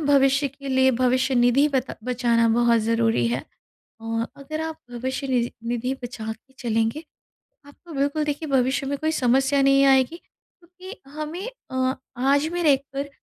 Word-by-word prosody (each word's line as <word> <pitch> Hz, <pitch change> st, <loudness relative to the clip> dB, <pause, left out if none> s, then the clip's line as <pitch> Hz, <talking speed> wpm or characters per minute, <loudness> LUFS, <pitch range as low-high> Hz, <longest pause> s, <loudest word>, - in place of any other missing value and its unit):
भविष्य 280 Hz, 0 st, +4 dB
के 275 Hz, +1 st, -10 dB
लिए, 260 Hz, 0 st, +4 dB
भविष्यनिधि 255 Hz, +1 st, +3 dB
बता 265 Hz, -2 st, -2 dB
बचाना 240 Hz, -2 st, +2 dB
बहुत 235 Hz, 0 st, +3 dB
ज़रूरी 225 Hz, -, +1 dB
है 125 Hz, +3 st, -2 dB, 0.6 s
और 225 Hz, +1 st, -2 dB
अगर 310 Hz, +3 st, -6 dB
आप 320 Hz, 0 st, -4 dB, 0.2 s
भविष्यनिजी 255 Hz, 0 st, -2 dB, 0.2 s
निधि 245 Hz, +2 st, -1 dB
बचा 235 Hz, -2 st, -6 dB
के 265 Hz, -, -28 dB
चलेंगे, 225 Hz, +5 st, -1 dB, 0.6 s
आपको 325 Hz, +4 st, -15 dB
बिल्कुल 285 Hz, +2 st, 0 dB
देखिए 300 Hz, +1 st, -3 dB
भविष्य 265 Hz, +1 st, +1 dB
में 285 Hz, +1 st, -1 dB
कोई 315 Hz, 0 st, 0 dB
समस्या 270 Hz, +1 st, +2 dB
नहीं 275 Hz, 0 st, +5 dB
आएगी 265 Hz, +3 st, +4 dB
क्योंकि 365 Hz, +4 st, -15 dB
हमें 310 Hz, +8 st, -5 dB, 0.2 s
अ, 260 Hz, 0 st, 0 dB, 0.2 s
आज 280 Hz, +4 st, +2 dB
भी 350 Hz, -, -1 dB
रह 290 Hz, -4 st, +5 dB
कर, 275 Hz, +1 st, -6 dB
265 Hz, 150 wpm, -24 LUFS, 245-285 Hz, 0.6 s, नहीं